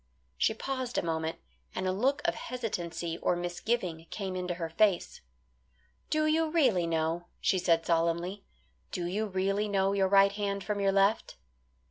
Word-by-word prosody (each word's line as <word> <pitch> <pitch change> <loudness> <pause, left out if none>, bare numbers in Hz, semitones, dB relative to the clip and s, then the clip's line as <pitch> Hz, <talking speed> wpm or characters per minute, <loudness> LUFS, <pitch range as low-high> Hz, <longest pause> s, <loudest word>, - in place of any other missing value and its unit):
She 220 - +1
paused 260 0 -3
a - - +1
moment, 160 -1 -2 0.4
and - - -2
a - - +2
look 255 +9 +1
of - - +2
hesitancy 175 -8 -4
or - - +1
misgiving 175 -1 -2
came 190 -3 -4
into 180 -1 -2
her 170 -1 -3
face. 190 +2 +1 0.9
"Do 310 0 +2
you 315 +1 +2
really 250 - +3
know," 165 +1 -1
she 185 - +2
said 165 -2 +2
solemnly, 170 +4 0 0.5
"do 175 - -3
you 205 +5 -1
really 195 +2 0
know 195 -1 +1
your 195 -1 +2
right 195 0 +6
hand 200 -1 -2
from 210 +1 -2
your 195 -1 +3
left?" 195 +3 +2
195 Hz, 160 wpm, -30 LUFS, 175-210 Hz, 0.9 s, right